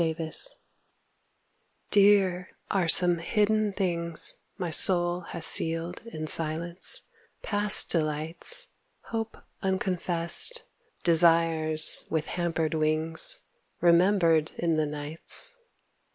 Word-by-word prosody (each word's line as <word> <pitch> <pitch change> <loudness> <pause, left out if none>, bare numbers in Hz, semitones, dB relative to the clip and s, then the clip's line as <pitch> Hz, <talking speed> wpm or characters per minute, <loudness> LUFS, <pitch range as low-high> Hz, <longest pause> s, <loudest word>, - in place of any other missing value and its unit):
FREE 160 -1 -3
WILL 160 -2 -8 1.6
Dear 195 -3 0 0.2
are 190 -4 -3
some 175 +1 +4
hidden 210 +3 -3
things 170 -4 +5 0.2
My 175 -3 -7
soul 175 +1 +6
has 165 - -4
sealed 165 +2 -1
in 155 -8 -9
silence; 165 - -3 0.4
past 205 -1 +1
delights, 160 - -1 0.5
Hope 225 -1 -7 0.2
unconfessed; 190 - -2 0.4
desires 165 -2 +3
with 160 -1 -5
hampered 165 -3 -5
wings, 155 +1 0 0.4
Remembered 170 -2 0
in 170 -1 -3
the 155 -1 -3
nights. 150 - 0
170 Hz, 95 wpm, -24 LUFS, 160-190 Hz, 1.6 s, soul